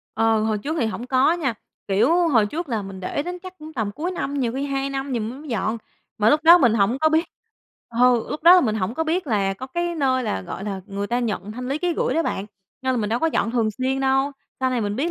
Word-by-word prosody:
Ờ, 225 0 +3
hồi 215 -1 0
trước 305 +9 -3
thì 230 - +2
hổng 230 +3 -5
có 260 +5 +3
nha, 290 -9 -1 0.3
kiểu, 310 - +3
hồi 230 -8 +4
trước 320 +9 -5
là 225 -5 -1
mình 195 -1 -8
để 195 +10 -2
đến 355 +2 -5
chắc 370 0 -11
cũng 310 +1 -10
tầm 220 -7 -2
cuối 320 - -3
năm, 285 -6 -3
nhiều 245 -5 0
khi 270 +2 -2
2 275 0 -2
năm 270 0 -3
gì 240 - 0
m 215 - -3
mới 305 - -11
dọn, 225 -1 -1 0.4
mà 215 +1 +4
lúc 300 - +4
đó 335 +2 +9
mình 240 -8 +4
hổng 220 +4 +2
có 315 - +4
biết 320 +2 +2 0.6
ờ, 245 +2 +4 0.2
lúc 305 - -4
đó 345 +2 +9
là 365 - +7
mình 220 -8 0
hổng 210 +1 -2
có 320 - -1
biết 330 +2 -1
là 200 -5 +1
có 255 +7 -7
cái 345 +5 -2
nơi 260 -4 +1
là, 215 - -2
gọi 190 - -7
là, 195 -2 -4
người 200 0 -4
ta 240 +3 0
nhận 210 -3 -3
thanh 250 +2 -6
lý 280 - -1
ký 355 +1 0
gửi - - 0
đó 330 - +2
bạn, 200 -10 -3 0.4
nên 260 0 +1
là - - -1
mình 210 - -1
đâu 235 - +1
có 325 - +1
dọn 300 -7 0
thường 230 -3 +1
xuyên 260 +5 -2
đâu. 270 +1 +2 0.3
Sau 260 0 +1
này 250 -2 0
mình 205 -1 -2
biết 310 +7 0
255 Hz, 280 wpm, -23 LUFS, 220-310 Hz, 0.6 s, đó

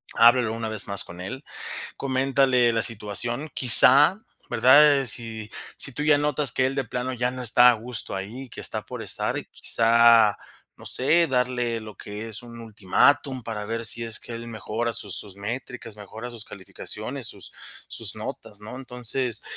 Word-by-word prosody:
Háblalo 120 -1 +4
una 115 -1 -5
vez 110 -2 -2
más 100 -1 -1
con 90 +1 -11
él, 130 +9 -7 0.5
coméntale 130 -2 +1
la 115 -1 0
situación, 120 +6 -2
quizá, 140 - +8 0.3
¿verdad?, 135 +4 +5
si 110 -2 -5 0.3
si 140 - -4
tú 145 - -5
ya 150 -1 +4
notas 145 -3 +1
que 130 - 0
él 135 - -3
de 135 - -1
plano 125 +3 -4
ya 125 0 -1
no 130 0 -6
está 125 +1 +5
a - - +1
gusto 115 -3 -6
ahí, 120 +7 -8
que - - -9
está - - -3
por - - -8
estar, - - -1
quizá, 115 -2 +3 0.4
no - - -12
sé, 165 +6 +2
darle 125 -2 -1
lo 110 -1 -11
que 105 +2 -8
es 110 - -6
un 115 -1 -12
ultimátum 125 +5 0
para 105 -2 -6
ver 115 +1 -4
si 115 +3 -1
es 115 -1 +1
que 120 - -9
él 115 0 -8
mejora 115 +2 -4
sus 100 -4 -2
sus 100 -2 -5
métricas, 115 +1 -7
mejora 110 +4 -9
sus 115 -2 -4
calificaciones, 95 -2 -5
sus - - -6 0.4
sus - - +1
notas, 105 - -8
¿no?, 110 +4 -10
entonces, 125 -1 -2
120 Hz, 175 wpm, -24 LUFS, 110-130 Hz, 0.5 s, quizá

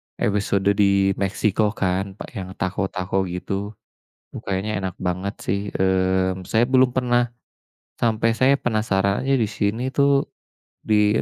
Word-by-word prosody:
episode 100 -1 0 0.2
di 100 -1 +4
Meksiko 105 +2 0
kan, 95 +1 -1
apa - - -8
yang 95 -4 -7
taco-taco 95 0 -2
gitu, 100 +4 -4 0.5
duh - - -8
kayaknya 100 +2 -2
enak 95 - -3
banget 95 +2 -2
sih, 100 +1 -1
mmm, 95 0 +1
saya 115 +6 +1
belum 130 -1 +4
pernah, 120 -1 +1 0.6
sampai 115 0 +1
saya 130 +4 +4
penasarannya 110 +2 0
di 110 - +1
sini 105 +4 -1
tuh, 140 0 +2 0.5
di 105 -1 +3
100 Hz, 130 wpm, -22 LUFS, 95-115 Hz, 0.6 s, di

